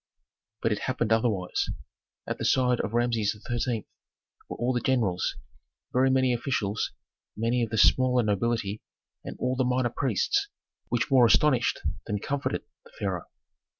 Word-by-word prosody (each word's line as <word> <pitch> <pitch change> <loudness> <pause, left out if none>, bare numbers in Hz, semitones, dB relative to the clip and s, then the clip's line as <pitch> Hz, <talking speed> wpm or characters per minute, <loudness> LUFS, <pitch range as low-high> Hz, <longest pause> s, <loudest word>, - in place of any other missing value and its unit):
But 115 - +2
it 105 - 0
happened 120 -4 0
otherwise. 110 -6 0 0.6
At - - -4
the - - -3
side 125 -2 +3
of 110 - -4
Rameses 115 -3 +1
XIII. 120 -2 -1 0.6
were - - -5
all 125 +2 0
the 120 - +1
generals, 115 -9 0 0.6
very 130 +1 +4
many 130 -1 +3
officials, 115 -4 -1 0.5
many 115 +3 +1
of 115 - 0
the 110 - -2
smaller 125 +3 +4
nobility 105 0 -1 0.4
and - - -7
all 125 +1 0
the 130 - +1
minor 125 -1 +1
priests, 125 -9 +1 0.4
which 120 +3 0
more 125 -3 +7
astonished 120 +2 +3 0.3
than 105 - -1
comforted 140 +7 -2 0.2
the 475 - -19
pharaoh. - - -3
120 Hz, 150 wpm, -27 LUFS, 110-130 Hz, 0.6 s, more